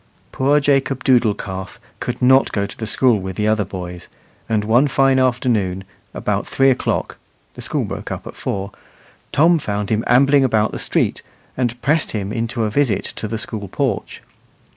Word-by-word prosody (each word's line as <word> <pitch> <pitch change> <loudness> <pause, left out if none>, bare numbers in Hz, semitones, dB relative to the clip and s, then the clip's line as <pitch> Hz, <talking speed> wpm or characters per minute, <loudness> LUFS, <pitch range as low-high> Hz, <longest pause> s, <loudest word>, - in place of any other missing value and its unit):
Poor 140 +3 +2
Jacob 135 -2 +1
Doodle 120 -5 +3
calf 95 -2 -7 0.2
could - - -4
not 130 +1 +5
go 100 -1 -1
to 100 - -9
the 110 - -5
school 120 -1 +2
with 95 -1 -6
the 105 +3 0
other 110 -1 +2
boys, 90 -2 -7 0.4
and 110 -2 +1
one 120 +7 +3
fine 135 -1 +3
afternoon, 115 -7 0 0.3
about - - -2
three 135 0 +3
o'clock 125 - -2 0.4
(the - - -10
school - - -2
broke - - -6
up - - -5
at - - -9
four), 100 0 -4 0.6
Tom 165 +3 +4
found 105 -5 -3
him 110 +1 +1
ambling 135 +3 +5
about 110 -4 +2
the - - -5
street, - - 0 0.3
and 120 -1 -1
pressed 155 +4 +1
him 105 -1 -3
into 115 0 -2
a 105 - -1
visit 125 -6 +1
to 110 - -4
the 115 +2 -3
school 105 -1 -6
porch. 125 +1 -3
115 Hz, 180 wpm, -19 LUFS, 105-135 Hz, 0.6 s, not